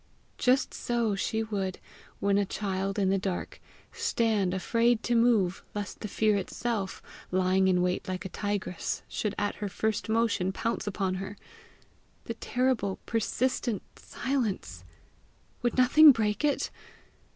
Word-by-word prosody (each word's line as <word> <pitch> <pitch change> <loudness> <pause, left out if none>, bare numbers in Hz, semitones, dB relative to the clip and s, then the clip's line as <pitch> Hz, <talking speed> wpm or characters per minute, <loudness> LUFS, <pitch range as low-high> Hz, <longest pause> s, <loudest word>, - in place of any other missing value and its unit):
Just 255 +2 +2
so 235 -3 0
she 220 +3 -1
would, 195 -4 -3 0.4
when 200 0 +2
a - - +3
child 195 0 -2
in 195 -2 +2
the 195 - +2
dark, 185 -2 -4 0.3
stand 225 - +1
afraid 230 +5 +2
to 240 - 0
move 230 -6 +3
lest 205 -1 -4
the 215 - -4
fear 215 +1 +2
itself, 200 0 -3 0.3
lying 185 +1 +3
in 180 -1 +3
wait 180 +3 -1
like 185 +1 -4
a - - -3
tigress, 205 -2 -3
should 210 -1 -2
at 205 0 -1
her 205 -1 -3
first 220 +3 -1
motion 220 -5 +1
pounce 230 +2 -2
upon 195 -2 -1
her. 200 +1 -7 0.9
The 230 - -4
terrible, 230 -4 0
persistent 230 -1 -1
silence! 205 - -3 0.8
would 240 +1 0
nothing 290 +4 +8
break 215 -1 0
it! 290 -1 +1
205 Hz, 140 wpm, -29 LUFS, 190-230 Hz, 0.9 s, nothing